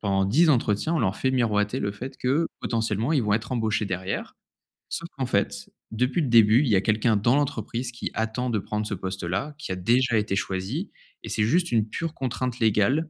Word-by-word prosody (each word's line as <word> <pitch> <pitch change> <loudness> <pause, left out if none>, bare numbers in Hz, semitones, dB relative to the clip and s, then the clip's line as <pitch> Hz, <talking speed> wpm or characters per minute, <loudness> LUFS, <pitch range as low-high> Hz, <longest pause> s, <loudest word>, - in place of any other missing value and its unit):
pendant 95 -2 +1
10 155 - +4
entretiens 120 +3 +1
on - - +1
leur 95 -3 0
fait 130 - 0
miroiter 105 -5 +1
le 100 - -1
fait 130 +6 -8
que, 145 +6 +1
potentiellement, 115 +4 -1
ils 140 - +2
vont 105 -1 0
être 110 +4 -3
embauchés 110 -3 0
derrière. 95 0 -4 0.5
Sauf 170 - -4
qu'en 135 - -1
fait, 100 -5 -1 0.2
depuis 125 +9 0
le 145 - 0
début 115 0 +6
il 150 - 0
y 105 - +4
a 95 - +4
quelqu'un 110 +3 +2
dans 120 +6 +3
l'entreprise 125 -3 -2
qui 120 - -5
attend 110 +3 -2
de 115 - 0
prendre 105 +1 -3
ce 105 - -3
poste 95 0 -5
là, 100 - -2
qui 145 - -6
a - - -3
déjà 120 +6 +2
été 105 -2 0
choisie 100 - -3 0.3
et - - -7
c'est 105 - +1
juste 170 +10 +2
une 110 -2 +2
pure 165 +8 -3
contrainte 125 -2 -3
légale, 115 +8 +2
115 Hz, 215 wpm, -25 LUFS, 105-130 Hz, 0.5 s, début